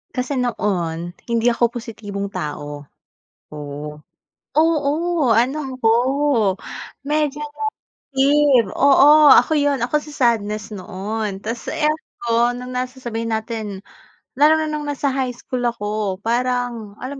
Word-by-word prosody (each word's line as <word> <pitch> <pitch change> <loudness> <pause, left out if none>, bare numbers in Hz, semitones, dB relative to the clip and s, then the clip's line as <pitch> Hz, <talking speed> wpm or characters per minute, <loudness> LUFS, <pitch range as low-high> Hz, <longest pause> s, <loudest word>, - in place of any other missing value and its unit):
Kasi 255 +1 -1
noon, 175 -8 -1 0.2
hindi 235 0 +1
ako 235 0 +2
positibong 205 -4 -6
tao, 145 -3 -6 0.7
oo. 150 0 -7 0.6
Oo, 315 -1 +2
ano 240 +5 +3 0.2
ako 225 -3 +2 1.2
medyo 295 -1 0 0.6
negative. 275 -3 +2
Oo, 295 +2 +6
ako - - +4
yun, 285 -1 +1
ako 255 +5 +1
si 300 0 -11
sadness 215 -4 0
noon. 200 +1 -5
Tapos 230 +2 -5
eto 245 -6 0
nung 250 +1 -7
na 250 0 -1
sasabihin 230 -3 -4
natin 215 -3 -5 0.5
lalo 300 +3 +5
na 315 - 0
nung 300 -1 -3
nasa 280 -1 -1
high 260 -1 -1
school 245 +1 -5
ako 210 -4 -2
parang 240 -3 -1
alam 255 +2 -6
240 Hz, 120 wpm, -20 LUFS, 210-280 Hz, 1.2 s, Oo